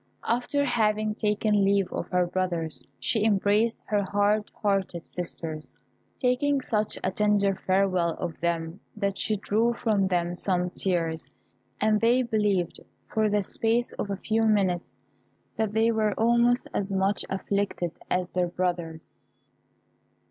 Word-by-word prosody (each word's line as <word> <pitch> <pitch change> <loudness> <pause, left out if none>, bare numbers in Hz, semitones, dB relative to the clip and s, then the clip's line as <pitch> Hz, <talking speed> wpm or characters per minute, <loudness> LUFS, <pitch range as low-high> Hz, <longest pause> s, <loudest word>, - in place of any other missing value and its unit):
After 250 +4 +1
having 215 -3 +1
taken 210 -1 +1
leave 195 -1 +2
of - - -3
her 180 -1 +2
brothers, 175 -3 -2 0.2
she 220 -3 0
embraced 215 +2 +2
her 210 -1 +1
hard 205 +2 +1
hearted 195 -4 -1
sisters, 165 -3 -5 0.4
taking 270 +2 +2
such 215 -4 -1
a 185 - +1
tender 205 -1 +2
farewell 185 -3 +1
of 170 -4 -5
them 165 +2 -2 0.2
that 200 -2 -1
she 215 - +1
drew 220 +3 +1
from 215 -4 +1
them 175 -1 0
some 180 -1 0
tears, 165 -4 -1 0.5
and 215 0 +2
they 240 +3 +4
believed, 210 -7 0 0.3
for 215 -1 +2
the 205 -1 +1
space 230 +5 0
of 200 - -2
a 200 - -2
few 220 +3 0
minutes, 195 -5 +1 0.6
that 220 -2 -1
they 225 +1 +3
were 215 -2 +1
almost 235 +2 +3
as 200 0 -2
much 195 +1 +1
afflicted 195 -3 -1 0.2
as 180 0 0
their 180 -1 +1
brothers. 170 -3 -3
200 Hz, 140 wpm, -27 LUFS, 180-220 Hz, 0.6 s, they